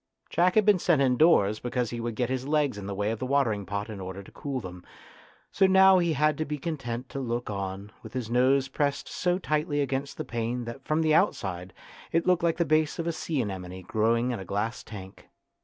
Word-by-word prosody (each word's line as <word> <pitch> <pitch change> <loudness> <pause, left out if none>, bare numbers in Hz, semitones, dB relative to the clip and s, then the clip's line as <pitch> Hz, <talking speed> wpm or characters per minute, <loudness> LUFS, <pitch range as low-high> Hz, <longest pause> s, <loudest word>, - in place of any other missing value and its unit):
Jack 180 +1 +3
had 215 -2 +5
been 205 -3 +5
sent 170 -4 +3
indoors 125 -6 +4
because 120 -1 -2
he 120 - -4
would 115 -1 -3
get 120 +2 0
his 130 +1 -3
legs 145 -4 +1
in 100 -1 -7
the 100 - -4
way 105 +2 0
of 115 - -4
the - - -3
water 135 -4 +2
ing 100 -2 -6
pot 100 0 -3
in 110 -3 -7
order 95 +1 -6
to - - -15
cool 140 -2 -4
them, 90 -4 -9 0.7
so 195 - +4
now 190 0 +7
he 170 -2 +1
had 150 +1 +1
to - - +1
be 150 -1 -4
content 130 -6 -4
to 135 - -6
look 120 -3 -3
on, 100 +1 -5
with 110 - -11
his 125 -3 -3
nose 130 +3 +3
pressed 140 +1 -1
so 180 0 0
tightly 150 -4 -1
against 140 0 -2
the - - -4
pane 120 +1 -3
that 120 +4 -8
from 160 +1 0
outside 95 - +1 0.4
it 165 0 +1
looked 180 -1 +3
like 170 -1 +1
the 170 - +2
base 155 0 +2
of 165 - -3
a 170 - 0
sea 155 -4 -2
anemone 95 -2 -6
growing 115 +5 +1
in 120 - -3
a - - -6
glass 105 +5 -2
tank. 95 -3 -11
125 Hz, 230 wpm, -27 LUFS, 105-155 Hz, 0.7 s, now